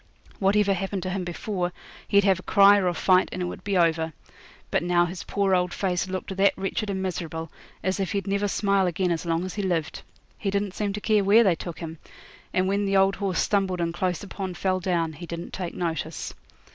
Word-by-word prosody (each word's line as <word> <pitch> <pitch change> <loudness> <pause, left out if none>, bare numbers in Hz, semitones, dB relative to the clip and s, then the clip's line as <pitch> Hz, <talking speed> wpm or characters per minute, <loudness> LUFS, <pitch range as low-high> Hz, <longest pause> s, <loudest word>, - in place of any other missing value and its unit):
Whatever 200 0 +3
happened 195 0 -3
to 185 - -2
him 190 0 -2
before 180 +1 -3 0.4
he'd 200 0 +4
have 190 -2 +3
a - - -10
cry 200 0 +7
or 185 - +1
a 175 - +1
fight, 185 +2 +3
and - - -5
it 180 - -1
would 175 - -6
be 200 -2 0
over. 160 -2 +2 0.6
But - - +2
now 175 0 +3
his 175 +1 -6
poor 200 -1 0
old 180 -1 +1
face 185 -2 0
looked 190 +1 -4
that 195 +1 +3
wretched 195 +2 -2
and 190 -1 -2
miserable, 165 -3 -4 0.3
as 190 +1 0
if 195 - -1
he'd 200 -1 -1
never 200 +1 0
smile 200 -1 +2
again 180 +1 0
as 170 0 -2
long 165 +2 0
as 185 - -5
he 210 - -3
lived. 170 -5 -1 0.4
He 200 - -1
didn't 200 -1 -1
seem 205 0 -1
to 210 - -5
care 215 -2 +3
where 210 +4 +6
they 190 -5 +4
took 170 0 -7
him; 165 -2 -7 0.5
and 185 0 +1
when 200 +1 +1
the 195 0 +2
old 195 +1 +3
horse 195 -4 -1
stumbled 195 -3 +1
and 170 -1 -1
close 180 0 -1
upon 190 -2 -5
fell 185 0 0
down 170 -3 0
he 170 +3 -9
didn't 170 +1 -6
take 180 -3 -4
notice. 160 -2 -3
185 Hz, 225 wpm, -25 LUFS, 175-200 Hz, 0.6 s, cry